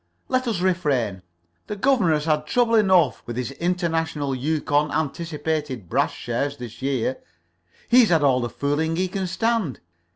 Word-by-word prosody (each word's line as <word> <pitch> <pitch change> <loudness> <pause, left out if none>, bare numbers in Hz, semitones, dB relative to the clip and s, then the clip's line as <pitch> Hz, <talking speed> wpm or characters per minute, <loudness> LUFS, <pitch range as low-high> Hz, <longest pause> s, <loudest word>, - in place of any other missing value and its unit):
Let 255 -1 0
us 210 -7 -1
refrain. 140 - 0 0.5
The 210 - -4
governor 215 -6 +2
has 150 0 -2
had 150 -1 0
trouble 240 +3 +2
enough 190 - +4
with 120 0 -5
his 125 +1 -3
International 165 -3 -1
Yukon 150 +2 0
Anticipated 150 - -3
Brass - - +1
shares 140 +4 -3
this 120 -1 -9
year. 130 -1 -1 0.7
He's 240 -2 +6
had 165 -4 +3
all 130 -3 +3
the 120 - -2
fooling 145 +6 -1
he 185 +2 0
can 190 0 -3
stand. 225 - -1
155 Hz, 155 wpm, -23 LUFS, 135-185 Hz, 0.7 s, He's